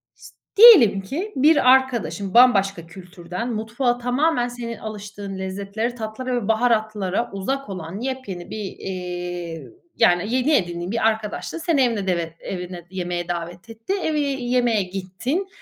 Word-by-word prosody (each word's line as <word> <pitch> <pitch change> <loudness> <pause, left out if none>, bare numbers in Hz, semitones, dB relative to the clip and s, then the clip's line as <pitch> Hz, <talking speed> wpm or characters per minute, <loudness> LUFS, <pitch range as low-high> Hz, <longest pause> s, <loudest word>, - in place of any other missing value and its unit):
s - - -15 0.2
diyelim 335 - +9
ki 335 - -5
bir 285 -1 +4
arkadaşın, 225 -8 +1
bambaşka 195 -8 +4
kültürden 180 +5 -6
mutfağı 235 +3 -1
tamamen 250 +2 +1
senin 240 -1 -6
alıştığın 205 -2 -7
lezzetlere, 200 +5 -3
tatlara 240 +3 -4
ve 230 -4 -2
baharatlara 215 -3 0
uzak 265 +7 -3
olan 185 0 -6
yepyeni 245 -9 -5
bir, - - -6
iii, 175 -5 -6 0.3
yani 205 0 +3
yeni 260 +4 +2
edindiğin 175 -3 -1
bir 230 0 +2
arkadaş 220 -1 -3
da - - -5
seni 325 -4 +1
evine 225 -6 0
devet 170 -3 -1
evine 180 -2 -6
yemeğe 175 -2 -3
davet 175 +3 -5
etti. 225 - -4
Evi 310 -1 0
yemeğe 245 -5 +1
gittin 195 - -3
215 Hz, 140 wpm, -22 LUFS, 185-245 Hz, 0.3 s, diyelim